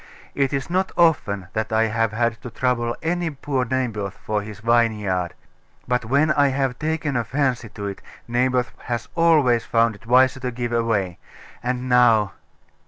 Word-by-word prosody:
It 135 -2 +1
is 135 -2 -2
not 185 +3 0
often 100 - +2
that 110 +1 -2
I 110 0 +3
have 115 0 0
had 115 0 -1
to 125 - -7
trouble 120 0 -1
any 175 +1 0
poor 135 -3 -2
Naboth 115 -6 -2
for 105 -1 -2
his 105 -1 -9
vineyard: 105 -6 +1 0.5
but 125 -2 0
when 140 +6 +3
I 145 -2 +4
have 135 -2 -1
taken 155 -2 -1
a 120 - +1
fancy 125 -3 -1
to 100 -1 -7
it, 100 -1 -5 0.3
Naboth 125 +1 +1
has 120 -1 -3
always 150 -9 +4
found 115 0 +2
it 115 +3 -16
wiser 130 +2 +4
to 130 -1 -3
give 120 0 -4
way. 110 -7 0 0.4
And 125 +1 -2
now.... 115 -5 +4
120 Hz, 170 wpm, -22 LUFS, 110-135 Hz, 0.5 s, I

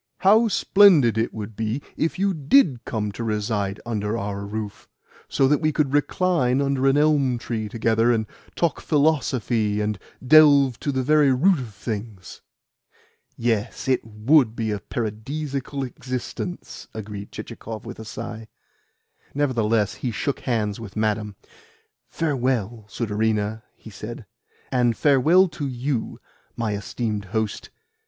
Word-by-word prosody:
"How 215 +4 +5
splendid 185 - +5
it 115 - 0
would 110 0 -7
be 110 +4 -2 0.2
if 160 - -1
you 195 +1 +1
DID 145 - +3
come 105 -4 -2
to 115 - -6
reside 105 -2 -1
under 110 -1 -2
our 100 -1 -4
roof, 105 -1 -6 0.4
so 135 -1 +3
that 150 +2 +2
we 155 -1 +2
could 145 -3 0
recline 145 -3 +2
under 135 -1 +1
an 135 +1 +4
elm 145 -4 +3
tree 110 -2 -4
together, 115 +1 +2
and 110 -2 +1 0.3
talk 170 -3 0
philosophy, 130 -8 +1
and 105 -1 -1 0.3
delve 140 -3 +6
to 145 - -2
the 130 -1 -1
very 150 0 +4
root 165 +7 +3
of 115 -6 -8
things!" 105 -4 -6 1.0
"Yes, 115 +1 -1
it 130 -1 +2
WOULD 115 +3 +2
be 110 -2 -2
a 105 - -2
paradisaical 135 +7 -4
existence!" 130 +7 -6
agreed 105 -2 -7
Chichikov 110 0 -8
with 120 - -8
a - - -6
sigh. 115 0 -7 0.9
Nevertheless 115 -7 +1
he 125 - -1
shook 130 +5 -2
hands 110 -5 -1
with 105 -4 -9
Madame. 105 -1 -1 0.7
"Farewell, 125 -8 -1
sudarina," 110 0 -1
he 110 - -13
said. 110 +3 -8 0.5
"And 120 -3 +2
farewell 155 +7 +5
to 150 -3 -4
YOU, 125 -1 -3 0.4
my 110 -2 -1
esteemed 105 +1 -3
host. 110 +1 -3
120 Hz, 135 wpm, -23 LUFS, 110-140 Hz, 1.0 s, delve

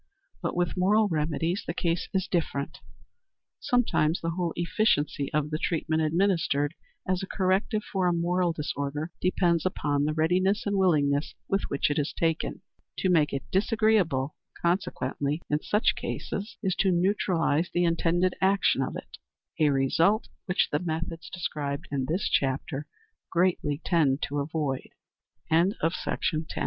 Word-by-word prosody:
But 170 - -2
with 175 0 0
moral 205 +4 +3
remedies 165 +3 -1
the 165 - -3
case 170 -1 -1
is 190 -2 0
different. 145 -5 -2 0.8
Sometimes 225 - +2
the 165 - -2
whole 175 0 -1
efficiency 165 -5 +1
of 150 -1 0
the 155 - -1
treatment 160 -2 0
administered 160 -3 +1 0.3
as 185 -1 +1
a 190 - -5
corrective 195 +3 0
for 190 -2 -1
a - - +3
moral 175 +1 +1
disorder 150 0 -3
depends 175 -2 +2
upon 145 -6 0
the 155 0 -1
readiness 185 +6 +2
and 205 -1 0
willingness 150 -6 +2
with 195 0 +1
which 140 +1 0
it 145 - 0
is 145 - -1
taken. 165 -1 -1 0.3
To 185 - +1
make 155 -4 +3
it 135 - -3
disagreeable, 190 - +2 0.2
consequently, 150 -4 -1
in 150 +1 +1
such 210 +3 +2
cases, 205 +3 -5
is 190 -2 +1
to 195 - +3
neutralize 175 -3 +1
the 175 - +1
intended 175 +2 +2
action 195 -7 +3
of 130 - -2
it - - -9 0.4
a 155 -2 +5
result 160 - +2 0.2
which 180 - +2
the 150 - +1
methods 165 0 -4
described 145 -5 -4
in 135 -2 -1
this 175 +5 0
chapter 135 +1 -1 0.4
greatly 170 -5 +1
tend 150 -5 +2
to 145 +1 -1
avoid. 140 -2 -2 0.6
CHAPTER 170 +5 +4 0.7
IX. - - -7
165 Hz, 145 wpm, -27 LUFS, 150-185 Hz, 0.8 s, a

